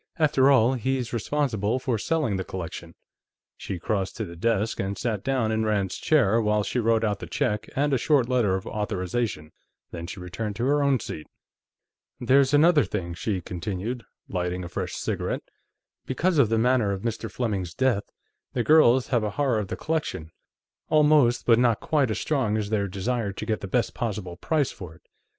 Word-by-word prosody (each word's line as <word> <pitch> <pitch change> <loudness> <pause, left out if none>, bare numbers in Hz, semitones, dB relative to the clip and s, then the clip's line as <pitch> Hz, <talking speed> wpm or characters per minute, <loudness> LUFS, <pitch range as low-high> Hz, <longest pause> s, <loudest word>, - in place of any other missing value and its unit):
"After 145 -4 +4
all, 130 -2 +5
he's 130 -1 -2
responsible 120 -3 0
for 125 -3 -1
selling 150 -8 0
the 95 - -2
collection." 85 -2 -7 0.6
She 95 - -5
crossed 95 +2 -2
to 110 - -2
the 85 -2 -9
desk 110 +4 0
and 100 +1 -2
sat 110 -5 -2
down 130 -5 0
in 110 0 0
Rand's 105 -3 0
chair 115 -8 +3
while 105 -1 +1
she 125 - -2
wrote 115 -1 +2
out 105 -2 0
the - - -7
check 105 0 -1
and 145 +1 +1
a 130 - +2
short 140 -2 +3
letter 120 -7 +2
of 95 - -4
authorization, 105 -5 -3 0.4
then 85 0 -6
she 100 +1 -7
returned 95 +4 -5
to 120 +3 -2
her 145 +2 +2
own 140 -2 +3
seat. 75 -6 -7 0.9
"There's 130 +2 +4
another 150 +1 +5
thing," 85 -5 -4
she 90 +3 -2
continued, 100 +8 -4 0.2
lighting 90 0 -2
a 85 - -6
fresh - - -4
cigarette. - - -3 0.6
"Because 165 +5 +1
of 120 -6 +5
the 115 - +2
manner 120 -3 +2
of 95 -1 -4
Mr. 115 -1 -3
Fleming's 100 -8 -3
death, 130 -6 +1 0.5
the 120 - 0
girls 130 -3 +5
have 120 -4 +1
a 105 - 0
horror 125 +2 0
of 105 - -3
the - - -5
collection 120 - -3 0.6
almost 150 -5 +4
but 115 -1 +5
not 120 -3 +3
quite 145 -5 +1
as 110 - -2
strong 125 -8 0
as 105 -1 -3
their 100 -2 +1
desire 100 +3 -2
to - - -6
get 110 - -1
the 100 - -5
best 120 +4 0
possible 105 -7 -4
price 145 - 0
for 90 -6 -10
it." 80 - -23
110 Hz, 190 wpm, -25 LUFS, 100-130 Hz, 0.9 s, all